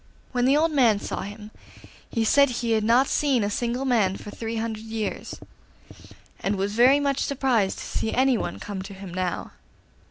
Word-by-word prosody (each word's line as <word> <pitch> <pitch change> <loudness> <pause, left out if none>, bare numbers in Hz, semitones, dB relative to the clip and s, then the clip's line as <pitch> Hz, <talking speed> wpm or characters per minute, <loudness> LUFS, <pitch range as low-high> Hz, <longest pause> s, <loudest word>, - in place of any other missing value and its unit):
When 245 -1 +1
the 275 +3 +4
old 320 +1 +2
man 245 -8 +4
saw - - -4
him 210 +2 -8 0.6
he 230 - 0
said 280 +4 +5
he 240 -1 -2
had 220 -1 +2
not 240 +5 +4
seen 270 -6 +1
a 205 - -1
single 240 +4 -2
man 215 -7 +2
for 205 - -9
three 225 +1 -5
hundred 220 -1 -3
years, 220 -2 -4 1.0
and 200 +1 -1
was 200 +1 -2
very 250 +5 +5
much 280 -1 0
surprised 255 -8 +1
to - - -6
see 220 - -2
anyone 260 -2 +1
come 200 -2 -6
to 195 +1 -9
him 190 -2 -9
now. 185 -1 -3
230 Hz, 185 wpm, -25 LUFS, 205-260 Hz, 1.0 s, said